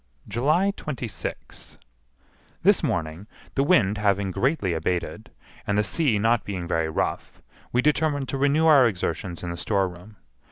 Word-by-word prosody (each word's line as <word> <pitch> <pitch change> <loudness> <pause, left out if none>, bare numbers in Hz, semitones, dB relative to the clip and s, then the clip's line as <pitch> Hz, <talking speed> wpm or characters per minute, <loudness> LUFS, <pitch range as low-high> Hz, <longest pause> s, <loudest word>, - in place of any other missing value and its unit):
July 155 - +2
26. 125 -8 -6 0.9
This - - +5
morning, 80 +4 -3 0.3
the 135 - +1
wind 110 - +3
having 100 -2 +1
greatly 125 - 0
abated, 85 +2 -3 0.4
and 100 - +1
the 105 - +3
sea 120 +1 +1
not 115 +2 +2
being 90 -4 -5
very 80 -1 0
rough, 80 - -3 0.3
we 125 +1 +1
determined 150 -2 +1
to 135 - -2
renew 145 +3 +3
our 145 -6 +7
exertions 90 -3 -3
in 85 - -3
the 85 - -6
storeroom. 95 +1 -2
105 Hz, 145 wpm, -24 LUFS, 90-140 Hz, 0.9 s, our